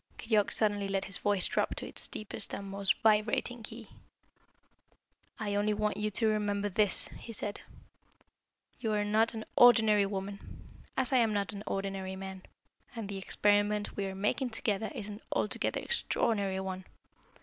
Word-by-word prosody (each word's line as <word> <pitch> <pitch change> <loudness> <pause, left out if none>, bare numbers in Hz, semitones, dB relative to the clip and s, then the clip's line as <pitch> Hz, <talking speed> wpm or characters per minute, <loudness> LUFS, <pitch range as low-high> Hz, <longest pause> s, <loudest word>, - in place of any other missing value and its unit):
Keyork 220 -3 +1
suddenly 205 -2 +1
let 195 0 -1
his 195 - 0
voice 205 -3 +2
drop - - 0
to - - -5
its - - +2
deepest 215 - -4
and 200 - -7
most 195 0 0
vibrating 220 +2 +2
key. 225 +1 -9 1.5
"I 210 -2 -2
only 205 +1 +1
want 210 0 0
you 210 0 0
to 220 +2 +1
remember 205 -1 0
this," 205 0 +2
he 230 - -10
said. 205 -2 -5 1.2
"You 225 -3 -1
are 210 0 +1
not 220 +2 +2
an 220 - -5
ordinary 220 -4 +6
woman, 200 0 -7 0.2
as 265 0 0
I - - +5
am 225 -3 +3
not 205 +1 -1
an 200 - -6
ordinary 195 -1 -3
man, 190 0 -7 0.5
and 225 -3 -5
the 195 -1 -4
experiment 205 +2 +1
we 200 -1 -2
are 190 - -5
making 210 +6 0
together 215 -1 -1
is 205 - -5
an 210 +1 -8
altogether - - -1
extraordinary 200 - +1
one. 190 -1 -5
205 Hz, 160 wpm, -31 LUFS, 195-220 Hz, 1.5 s, ordinary